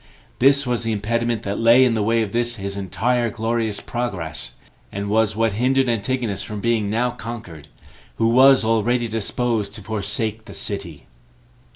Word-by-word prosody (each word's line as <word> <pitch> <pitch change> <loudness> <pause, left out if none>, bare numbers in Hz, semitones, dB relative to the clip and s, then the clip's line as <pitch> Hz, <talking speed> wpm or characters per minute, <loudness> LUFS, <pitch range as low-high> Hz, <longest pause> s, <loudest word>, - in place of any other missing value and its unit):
This 140 +2 +5
was 125 -1 0
the 115 -1 -1
impediment 115 +2 -1
that 100 0 -3
lay 115 +3 +6
in 125 - +2
the 110 - 0
way 115 +2 +2
of 105 - -5
this 120 +1 0
his 100 -2 -4
entire 120 +5 0
glorious 110 -1 -1
progress, 80 - -4 0.4
and 100 +1 -4
was 110 -2 +2
what 115 -1 +1
hindered 130 +4 +2
Antigonus 115 -1 -1
from 105 -1 -5
being 110 -2 0
now 120 +3 0
conquered, 100 -10 -8 0.5
who 115 0 +2
was 130 +1 +6
already 115 +2 +1
disposed 110 -1 -2
to 105 - -9
forsake 110 +1 -2
the - - -10
city. 85 -8 -5
115 Hz, 165 wpm, -21 LUFS, 105-120 Hz, 0.5 s, lay